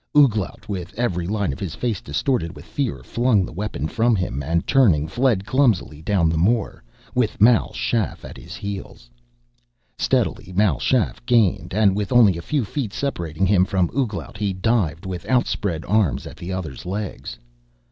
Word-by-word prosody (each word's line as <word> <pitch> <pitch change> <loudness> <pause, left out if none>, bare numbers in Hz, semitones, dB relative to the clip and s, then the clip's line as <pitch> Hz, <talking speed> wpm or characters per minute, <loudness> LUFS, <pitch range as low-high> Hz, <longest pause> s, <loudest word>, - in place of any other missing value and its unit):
Ouglat, 110 -10 +2
with 90 -4 -5
every 90 -8 -1
line 100 -6 -1
of - - -9
his 90 -4 -4
face 115 -6 -2
distorted 85 - -1
with - - -12
fear, 140 -4 -3
flung 120 -5 +2
the - - -9
weapon 90 -5 -3
from 115 +5 +2
him, 90 -8 -2
and 85 +4 -1
turning, 90 - +4
fled 115 0 +1
clumsily 105 - +1
down 90 -1 +2
the 80 0 +1
moor, 105 - +1 0.3
with 125 -4 0
Mal 115 +2 +5
Shaff 115 -5 -2
at - - -9
his - - -10
heels. 95 -11 -7 0.9
Steadily 90 - 0
Mal 95 - +2
Shaff 125 -2 0
gained 105 -7 +2
and 100 -3 +4
with 105 -1 -2
only 115 -7 +6
a 85 - -5
few 135 - -1
feet 110 0 -4
separating 85 - -2
him 95 -1 +4
from 95 -2 0
Ouglat, 120 -4 -2
he 105 -2 -1
dived 95 -5 0
with 90 -2 -5
outspread 100 -9 0
arms 85 - +1
at 80 - -10
the 90 +2 -6
other's 85 -8 -5
legs. 100 +2 -5
100 Hz, 170 wpm, -22 LUFS, 85-115 Hz, 0.9 s, only